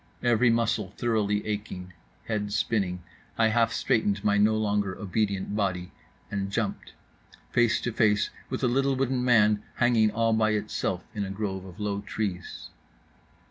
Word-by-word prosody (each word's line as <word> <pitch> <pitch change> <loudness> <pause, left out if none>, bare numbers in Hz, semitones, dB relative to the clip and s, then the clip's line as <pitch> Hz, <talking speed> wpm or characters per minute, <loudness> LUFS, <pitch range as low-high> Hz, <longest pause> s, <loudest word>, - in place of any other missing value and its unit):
Every 120 0 +4
muscle 110 -4 0
thoroughly 105 -3 0
aching, 100 -4 -5 0.3
head 105 -2 -2
spinning, 95 -5 0 0.3
I 115 -1 +4
half 115 +1 +2
straightened 105 -3 +1
my 105 -1 +3
no 105 +1 +4
longer 105 -3 0
obedient 100 -1 -1
body; 95 -3 -1 0.4
and 100 -1 -2
jumped: 110 -1 -3 0.6
face 120 -2 +3
to 120 - -2
face 105 -2 +2 0.2
with - - -3
a - - +4
little 135 +2 +2
wooden 130 -1 0
man 105 -4 +4
hanging 115 -3 +3
all 115 +1 +1
by 110 -1 +2
itself 105 - -2
in 105 - -2
a 95 - -4
grove 95 -1 -4
of 95 +2 -12
low 100 -1 -2
trees. 100 -4 -5
105 Hz, 150 wpm, -27 LUFS, 100-115 Hz, 0.6 s, Every